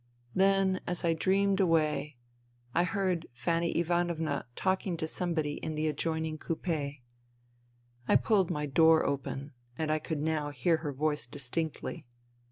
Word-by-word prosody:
Then, 195 -1 +3
as 175 0 -2
I 165 - +3
dreamed 195 +3 +2
away, 155 -5 +2 0.6
I 175 - +3
heard 185 -4 -1
Fanny 170 +6 0
Ivanovna 170 -4 0
talking 190 -2 0
to 160 - -2
somebody 160 -3 -2
in 155 - -4
the 155 +1 -1
adjoin 160 +1 -1
ing 155 -1 -4
coupe. 155 -4 -2 1.1
I - - +4
pulled 200 -6 +3
my 150 0 -1
door 160 +3 +5
open 140 0 -3 0.3
and 155 -1 0
I 155 - +2
could 155 -1 -3
now 155 -2 0
hear 145 +4 +2
her 155 -2 -4
voice 150 0 -1
distinctly. 145 +2 -4
160 Hz, 145 wpm, -31 LUFS, 150-175 Hz, 1.1 s, door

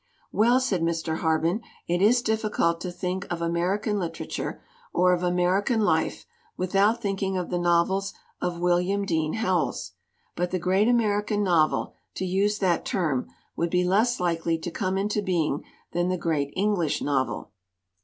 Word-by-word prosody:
"Well," 240 +4 +4
said 210 -9 0
Mr. 165 -1 -1
Harben, 165 +5 +1 0.3
"it 175 +1 0
is 240 +4 +4
difficult 215 -7 0
to 180 - -4
think 180 +1 -4
of 175 - -2
American 185 +5 0
literature 170 -3 -4 0.3
or 180 0 +4
of 175 - 0
American 180 +6 +2
life 210 - +1 0.3
without 200 +5 +2
thinking 195 -3 -1
of 180 - -3
the 175 - 0
novels 175 +3 +2 0.3
of 175 -1 -2
William 180 +3 +1
Dean 160 -4 0
Howells. 185 - -1 0.4
But 180 0 -1
the 185 - -1
great 190 +4 +2
American 210 -3 +2
novel, 170 -5 +2 0.2
to 190 - -2
use 200 +3 +1
that 185 -4 +1
term, 160 - -1 0.3
would 170 - 0
be 180 +1 +2
less 215 +7 +2
likely 165 -2 0
to 170 +2 -5
come 185 +2 -1
into 205 +2 0
being 165 -7 0 0.3
than 175 +1 0
the 185 - 0
great 150 -5 -1
English 190 -6 0
novel. 135 -2 -1
180 Hz, 155 wpm, -26 LUFS, 170-205 Hz, 0.4 s, Well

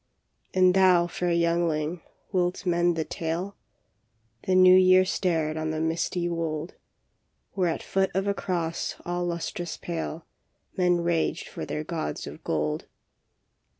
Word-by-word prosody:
" - - -45
And 185 -1 +5
thou, 185 -2 +5
fair 175 0 -2
youngling, 170 -1 0 0.3
wilt 180 -1 0
mend 175 -1 +2
the 160 -1 -1
tale? 170 +5 -3 0.5
" 110 0 -30
The 185 - +3
New 185 0 +8
Year 185 0 +6
stared 160 -5 0
on 155 0 -2
the 155 0 -2
misty 170 +2 -1
wold, 165 -1 -3 0.8
Where 185 -3 +1
at 165 - -3
foot 190 0 +1
of 195 +1 +1
a 200 - +1
cross 170 -4 -2
all 175 0 -2
lustrous 175 0 -4
pale 165 -1 -5 0.5
Men 180 -2 +2
raged 170 -1 0
for - - -7
their 150 - -3
gods 160 0 -4
of - - -10
gold. 75 -1 -2
170 Hz, 150 wpm, -26 LUFS, 160-180 Hz, 0.8 s, New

